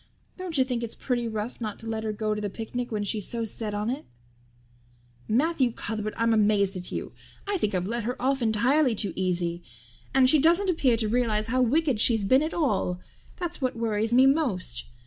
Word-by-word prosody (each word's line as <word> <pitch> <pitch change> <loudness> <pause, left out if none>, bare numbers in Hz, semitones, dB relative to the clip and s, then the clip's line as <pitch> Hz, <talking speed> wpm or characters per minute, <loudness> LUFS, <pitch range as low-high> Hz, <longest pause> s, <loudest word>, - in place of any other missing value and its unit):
Don't 365 -4 -4
you 260 - +5
think 250 -2 -2
it's 230 -1 -5
pretty 240 -2 -2
rough 220 +2 -5
not 215 -2 -4
to - - -13
let 220 -1 -3
her 220 - -1
go 215 0 -1
to 210 - -4
the 205 - -2
picnic 240 +4 -5
when 210 -1 -1
she's 205 0 -2
so 230 -1 -3
set 215 -1 -5
on 210 +1 -2
it?" 275 +4 -4 1.2
"Matthew 265 +1 +2
Cuthbert, 215 -2 -4
I'm 230 0 +2
amazed 205 -2 +3
at 180 -1 -6
you. - - -4 0.4
I 400 -2 0
think 205 - 0
I've 180 0 0
let 230 +2 -3
her 250 +2 -3
off 270 +1 0
entirely 240 +4 +2
too 200 -4 +1
easy. 175 -2 -1 0.5
And 265 -1 +5
she 300 +4 +6
doesn't 345 +6 +4
appear 260 -8 +2
to 220 -1 0
realize 220 -2 0
how 255 +2 +2
wicked 270 0 +2
she's 220 -2 +2
been 260 +7 +4
at 310 +2 -1
all 205 - 0 0.4
that's 350 -3 -5
what 255 -2 0
worries 225 -1 0
me 255 +2 +6
most. 255 - 0
230 Hz, 205 wpm, -26 LUFS, 210-260 Hz, 1.2 s, she